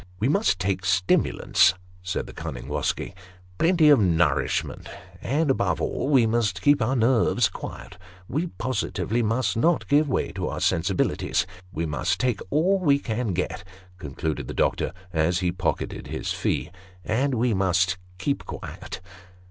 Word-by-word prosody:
" 90 - -27
We 110 - +1
must 195 - +2
take 95 0 -1
stimulants," 95 0 +3 0.3
said 90 +1 -3
the - - -11
cunning - - -6
Wosky 75 +6 -2 0.2
" 90 0 -26
plenty 165 -3 +5
of 145 -4 +7
nourishment, 85 - +1 0.3
and, 145 +3 +1
above - - 0
all, - - -2
wo 130 -5 +5
must 110 -4 0
keep 145 -2 +4
our 120 +4 +1
nerves 120 -2 +3
quiet; 90 - -9 0.3
we 155 +7 -1
positively 120 - -2
must 115 +3 0
not 165 +9 +2
give 145 +1 +3
way - - 0
to - - -3
our - - -4
sensibilities. 85 0 +1 0.3
We 85 -4 -2
must 75 -2 -1
take 125 -5 0
all 185 - +2
we 145 -6 +4
can 115 -5 -2
get," 90 0 -3 0.4
concluded 70 -2 -4
the - - -6
doctor, - - +1 0.2
as 80 +2 +2
he 90 -1 +1
pocketed 90 -2 -3
his - - -4
fee, - - -1 0.2
" 90 -1 -26
and 130 +5 +1
we 120 0 +1
must 95 -1 +1 0.2
keep 140 +9 -1
quiet." - - -7
105 Hz, 160 wpm, -25 LUFS, 90-135 Hz, 0.4 s, of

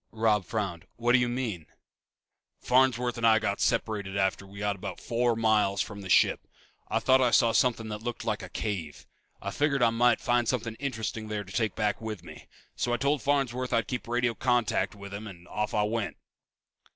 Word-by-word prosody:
Robb 110 -3 +1
frowned. 95 -5 -3
"What 120 +1 +1
do 125 - +6
you 125 0 +1
mean?" 115 -10 -3 0.9
"Farnsworth 125 -2 +2
and 115 - +3
I 110 -1 +6 0.2
separated 100 -3 0
after 95 0 0
we 100 +1 -13
got 105 0 -1
about 95 - -7
four 120 0 +1
miles 105 -3 +2
from 100 +2 -3
the 95 - -8
ship. - - +3 0.4
I - - 0
thought 130 0 +4
I 125 - +4
saw 115 0 +4
something 115 -1 +2
that 105 0 -5
looked 120 0 -5
like 110 -1 -1
a - - -8
cave. 90 -9 -4 0.4
I - - -3
figured 140 -3 +1
I 115 - +5
might 120 +1 +3
find 120 -1 +1
something 115 -2 -1
interesting 110 -5 -3
there 105 -1 -3
to 95 0 -12
take 110 +2 0
back 105 0 0
with 110 -5 -5
me. - - -12 0.3
So 120 - -1
I - - +2
told 140 +2 +1
Farnsworth 130 -3 0
I'd 115 - +2
keep 125 -3 -4
radio 120 0 +1
contact 120 -3 +1
with 100 -1 -10
him 105 +2 -6
and 90 -3 -12
off 105 0 -2
I 105 - +3
went." 110 0 -2
115 Hz, 200 wpm, -28 LUFS, 105-120 Hz, 0.9 s, do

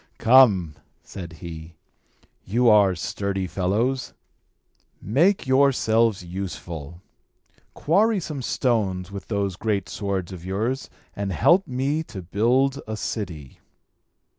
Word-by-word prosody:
"Come!" 110 - +5 0.3
said 85 -4 -8
he. 80 -1 -9 0.7
"You 120 +5 +2
are 100 -3 +5
sturdy 95 +3 -3
fellows. 105 +9 -1 0.8
Make 170 - +2
yourselves 115 -7 +2
useful! 85 -3 -7 0.7
Quarry 205 +7 +2
some 155 -5 -5
stones 100 -8 -1
with 100 -1 -8
those 100 -3 -1
great 105 -2 -1
swords 95 -3 -3
of 90 -3 -9
yours, 110 +8 -2 0.3
and 100 -1 -3
help 170 - +3
me 135 +5 -1
to 95 -9 -8
build 125 +9 +1
a 110 0 -4
city." 85 - -5
100 Hz, 110 wpm, -24 LUFS, 90-130 Hz, 0.8 s, Come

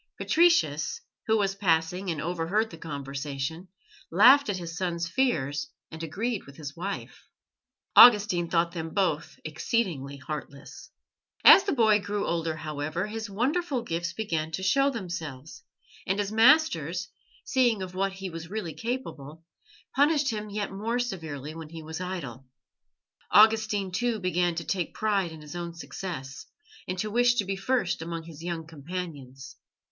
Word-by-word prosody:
Patricius, 160 - +2 0.3
who 220 0 +3
was 195 -2 +1
passing 180 -1 0
and 160 -3 -2
overheard 175 +7 -1
the 165 - -9
conversation, 140 +2 -5 0.4
laughed 255 - +6
at 200 - -1
his 170 -2 -6
son's 170 -1 -2
fears 150 - 0 0.2
and 160 - -8
agreed 200 - -3
with 140 - -13
his 145 -2 -7
wife. 195 +4 -6 0.7
Augustine 205 -7 +7
thought 170 0 +2
them 165 -2 -6
both 185 -7 -1
exceedingly 155 - -2
heartless. 140 -1 -8 0.5
As 390 - +9
the 395 - 0
boy 220 -5 +4
grew 205 0 -2
older, 165 -1 -1
however, 155 +3 -3
his 220 0 -5
wonderful 265 - -1
gifts 170 -4 -3
began 170 -6 -2
to 190 - -3
show 275 +9 +3
themselves, 165 - -6 0.5
and 195 - +1
his 205 0 -1
masters, 215 - +3 0.3
seeing 240 -7 +2
of 185 -1 -7
what 195 +1 -1
he 190 -1 -6
was 165 0 -8
really 195 -6 -4
capable, 160 - -5 0.5
punished 290 -1 +3
him 215 -1 -5
yet 205 0 -3
more 220 +5 -2
severely 160 - -4
when 160 -1 -9
he 165 0 -9
was 160 +3 -6
idle. 140 -9 -6 0.8
Augustine, 215 -3 +4
too, 235 +4 0
began 180 -2 0
to 170 - -3
take 175 +1 -2
pride 200 -5 0
in 160 -1 -10
his 150 +2 -10
own 170 -1 -5
success, 160 -6 -7 0.4
and 185 - -3
to 215 +3 -2
wish 240 +2 +4
to 205 - +1
be 195 +1 -2
first 195 -3 0
amongst 165 0 -5
his 160 -2 -11
young 170 -1 -4
companions. 145 -5 -8
180 Hz, 150 wpm, -27 LUFS, 160-215 Hz, 0.8 s, As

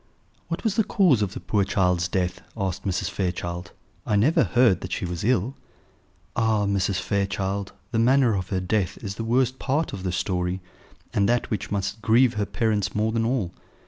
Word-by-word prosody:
"What - - -4
was 220 -2 0
the 220 - +5
cause 180 - +3
of 100 -2 -1
the - - -4
poor 105 -2 +1
child's 90 -3 +1
death?" 90 -2 -1 0.2
asked 95 -2 -2
Mrs. 90 -1 -1
Fairchild. 90 -1 -3 0.3
"I 105 - 0
never 120 +11 +4
heard 120 -7 +3
that 90 - -6
she 90 - -2
was 85 -1 -4
ill." 125 +1 +1 0.8
"Ah! 110 -3 +2
Mrs. 100 -1 +1
Fairchild, 100 0 -1 0.2
the 115 - +1
manner 125 0 +4
of 95 -2 -3
her 95 - 0
death 95 +1 -1
is 100 -2 -3
the 115 - -5
worst 125 +3 +1
part 145 +4 0
of 100 - -5
the 90 -1 -2
story, 90 0 -1 0.5
and 100 0 +2
that 120 0 +1
which 105 -4 -2
must 100 +1 -2
grieve 120 +2 +4
her 105 -2 -1
parents 105 -4 0
more 110 +1 +1
than 115 0 0
all. 115 -8 0
100 Hz, 190 wpm, -25 LUFS, 95-115 Hz, 0.8 s, the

